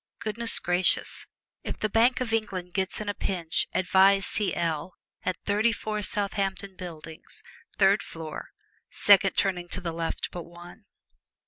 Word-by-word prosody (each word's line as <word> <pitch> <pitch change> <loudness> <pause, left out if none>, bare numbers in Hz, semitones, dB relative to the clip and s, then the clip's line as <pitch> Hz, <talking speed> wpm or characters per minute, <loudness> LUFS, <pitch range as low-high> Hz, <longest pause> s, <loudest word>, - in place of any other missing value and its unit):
Goodness 230 +1 +1
gracious, 175 +1 +2 0.4
if - - -5
the 215 - -1
Bank 230 +5 +3
of 230 -3 -2
England 185 -5 -2
gets 190 -1 -2
in 215 - -6
a 205 - -1
pinch 175 -6 -1
advise 195 +1 +4
C.L., 170 -4 -1 0.3
at 185 - -2
Thirty 210 +3 +2
four 215 -1 -4
Southampton 200 -1 0
Buildings, 165 -3 -10 0.3
third 200 +1 +4
floor, 160 -2 -8 0.4
second 200 -1 +4
turning 180 -3 0
to 180 - -3
the 170 -2 -4
left 165 0 -3
but 175 - -6
one. 175 +5 -14
190 Hz, 140 wpm, -27 LUFS, 175-210 Hz, 0.4 s, advise